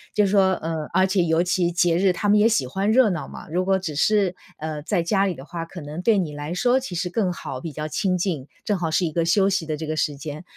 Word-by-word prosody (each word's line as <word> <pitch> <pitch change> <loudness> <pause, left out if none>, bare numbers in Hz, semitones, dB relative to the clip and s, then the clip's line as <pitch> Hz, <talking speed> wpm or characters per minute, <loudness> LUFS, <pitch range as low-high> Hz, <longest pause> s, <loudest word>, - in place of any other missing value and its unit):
就 210 - +4
是 195 - 0
说 190 -2 +4
呃， 160 -3 -3
而 185 - +4
且 190 -1 +2
尤 165 0 +2
其 180 -1 +1
节 170 0 +2
日， 190 +1 +3
他 180 +3 -2
们 210 +1 +5
也 215 - +5
喜 210 - +1
欢 195 +11 -1
热 240 -2 +5
闹 170 -4 -4
嘛， - - -10
如 180 +3 0
果 190 0 +3
只 170 -6 -5
是， 195 +2 +2 0.2
呃， 155 -1 -5
在 170 +2 0
家 195 +3 +2
里 180 - -2
的 135 - -11
话， 165 +2 -5
可 175 +2 -10
能 150 +4 -6
对 215 +2 +3
你 165 -6 -1
来 145 +2 -6
说 245 +6 +3
其 255 -9 -6
实 175 +2 -1
更 185 0 0
好， 130 -6 -6
比 160 - -5
较 155 +2 -5
清 185 +2 0
静， 165 -7 -2 0.2
正 210 - +1
好 165 -2 -1
是 165 +3 +1
一 160 - -2
个 170 +2 0
休 190 +4 +3
息 190 -4 0
的 155 - -1
这 160 - -5
个 155 - -2
时 150 -1 0
间， 150 +3 -7
175 Hz, 305 characters per minute, -23 LUFS, 155-195 Hz, 0.2 s, 们